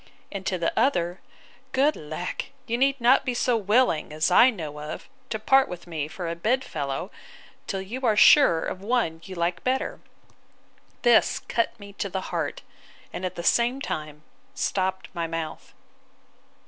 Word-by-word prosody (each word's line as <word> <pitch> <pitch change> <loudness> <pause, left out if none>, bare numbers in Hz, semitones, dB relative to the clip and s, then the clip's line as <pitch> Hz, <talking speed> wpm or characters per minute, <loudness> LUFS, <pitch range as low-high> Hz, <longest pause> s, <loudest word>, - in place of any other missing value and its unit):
And 195 -1 -5
to 185 - 0
the 170 -1 -1
other, 185 -8 +1 0.5
Good 285 +3 +3
lack! 155 +4 -5 0.2
you 235 -2 -1
need 270 +2 +2
not 245 +3 +5
be 250 -2 -2
so 245 0 +2
willing, 210 -7 +2
as 155 +1 0
I 250 - +7
know 155 - -6
of, 150 +1 -7 0.2
to 220 - -2
part 265 +5 +4
with 180 -1 -8
me 160 -4 -4
for 175 +2 -6
a 165 - -2
bed 240 +10 +1
fellow, 145 - -4 0.6
till 195 -1 -3
you 235 +7 -6
are 220 -4 +3
sure 210 - +6
of 185 - -5
one 200 -7 0
you 190 - -8
like 170 +1 -1
better. 260 +1 -1 1.0
This 240 -2 +5
cut 230 -1 -2
me 200 -1 -11
to 200 - -1
the 190 0 -5
heart; - - -2 0.5
and, - - -5
at 185 0 -4
the 170 - -5
same 240 +7 +2
time, 150 - -5 0.3
stopped 190 -1 -1
my 170 -2 -2
mouth. 165 -1 -5
190 Hz, 170 wpm, -25 LUFS, 165-245 Hz, 1.0 s, I